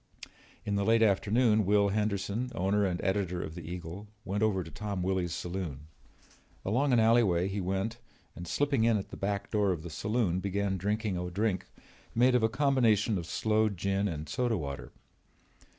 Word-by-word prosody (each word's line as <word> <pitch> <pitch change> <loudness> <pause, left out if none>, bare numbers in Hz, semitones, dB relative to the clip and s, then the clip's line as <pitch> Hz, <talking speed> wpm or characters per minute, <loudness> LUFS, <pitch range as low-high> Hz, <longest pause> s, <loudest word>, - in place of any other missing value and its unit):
In 105 - -1
the 100 - +1
late 115 +2 +4
afternoon 110 +2 +3
Will 100 +1 +3
Henderson, 105 +3 -1
owner 100 +2 +2
and 90 -1 -2
editor 95 -2 0
of 80 - -6
the 85 - -7
Eagle, 85 +4 -7 0.2
went 100 +2 -2
over 100 -4 +2
to 80 - -11
Tom 100 -3 -4
Willy's 90 -2 0
saloon. 85 -5 -4 0.8
Along 130 +8 +1
an 120 - +5
alleyway 110 -6 +4
he 100 +1 -3
went 95 +5 -2 0.4
and 85 +1 -8
slipping 140 - +1
in 115 -1 +4
at 95 - -5
the - - -8
back 100 0 -3
door 105 -3 +2
of 85 -3 -3
the 85 - -7
saloon 100 +2 0
began 100 0 -1
drinking 105 0 -1
a 90 0 -3
drink 100 +1 -1 0.5
made 125 +2 +4
of 125 - +4
a 110 - +3
combination 115 -6 +2
of 85 - -7
sloe 110 +2 +1
gin 100 +1 -1
and 80 -4 -4
soda 120 -3 0
water. 70 -4 -6
100 Hz, 180 wpm, -30 LUFS, 90-110 Hz, 0.8 s, an